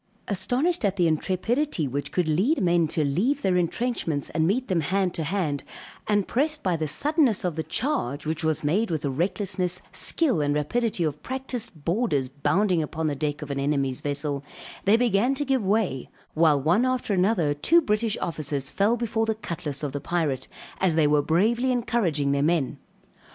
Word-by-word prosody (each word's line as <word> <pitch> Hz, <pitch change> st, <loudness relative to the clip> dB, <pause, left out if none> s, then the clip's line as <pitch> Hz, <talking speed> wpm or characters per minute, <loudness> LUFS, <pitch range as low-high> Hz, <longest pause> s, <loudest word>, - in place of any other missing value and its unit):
Astonished 245 Hz, -, 0 dB
at 200 Hz, -2 st, +1 dB
the 180 Hz, -3 st, +2 dB
intrepidity 185 Hz, -, 0 dB
which 140 Hz, +2 st, -4 dB
could 180 Hz, -3 st, 0 dB
lead 205 Hz, -, +2 dB
men 175 Hz, -3 st, +3 dB
to 155 Hz, 0 st, 0 dB
leave 220 Hz, -, 0 dB
their 190 Hz, -2 st, +2 dB
entrenchments 175 Hz, -, -1 dB
and 160 Hz, 0 st, +1 dB
meet 245 Hz, +7 st, 0 dB
them 180 Hz, -3 st, +1 dB
hand 185 Hz, +3 st, 0 dB
to 165 Hz, -, -2 dB
hand, 155 Hz, -4 st, -1 dB, 0.4 s
and 205 Hz, -2 st, +1 dB
pressed 300 Hz, +4 st, 0 dB
by 185 Hz, -3 st, +1 dB
the 155 Hz, -1 st, -2 dB
suddenness 285 Hz, -, +2 dB
of 175 Hz, -4 st, -1 dB
the 160 Hz, -, -1 dB
charge, 155 Hz, -, -2 dB
which 160 Hz, +1 st, -2 dB
was 160 Hz, -2 st, 0 dB
made 195 Hz, +10 st, +1 dB
with 160 Hz, -4 st, -2 dB
the 140 Hz, -, -1 dB
recklessness, 180 Hz, +3 st, -1 dB
skill 270 Hz, -, +1 dB
and 145 Hz, 0 st, +1 dB
rapidity 190 Hz, +6 st, 0 dB
of 150 Hz, -2 st, -2 dB
practised 250 Hz, -, -4 dB
boarders 170 Hz, -, 0 dB
bounding 160 Hz, +6 st, +1 dB
upon 160 Hz, +1 st, -3 dB
the 150 Hz, -2 st, 0 dB
deck 145 Hz, +1 st, -2 dB
of 145 Hz, -, -6 dB
an 140 Hz, -, -2 dB
enemy's 140 Hz, -2 st, 0 dB
vessel, 145 Hz, -1 st, -2 dB, 0.4 s
they 205 Hz, +3 st, +5 dB
began 240 Hz, +2 st, +2 dB
to 290 Hz, -, -1 dB
give 265 Hz, -4 st, +1 dB
way, 190 Hz, -, 0 dB, 0.2 s
while 155 Hz, -2 st, +4 dB
one 170 Hz, -, +2 dB
after 255 Hz, -4 st, 0 dB
another, 180 Hz, -5 st, +2 dB
two 285 Hz, -, +4 dB
British 215 Hz, -5 st, 0 dB
officers 145 Hz, -4 st, -2 dB
fell 210 Hz, +4 st, +2 dB
before 225 Hz, -1 st, -1 dB
the 220 Hz, -, 0 dB
cutlass 155 Hz, -8 st, -5 dB
of 145 Hz, -, -2 dB
the 145 Hz, +1 st, -4 dB
pirate, 150 Hz, -5 st, -1 dB, 0.3 s
as 185 Hz, -4 st, +2 dB
they 160 Hz, -2 st, +4 dB
were 150 Hz, 0 st, +4 dB
bravely 225 Hz, -, +2 dB
encouraging 200 Hz, -, 0 dB
their 140 Hz, 0 st, +1 dB
men. 155 Hz, -2 st, 0 dB
175 Hz, 185 wpm, -25 LUFS, 150-225 Hz, 0.4 s, they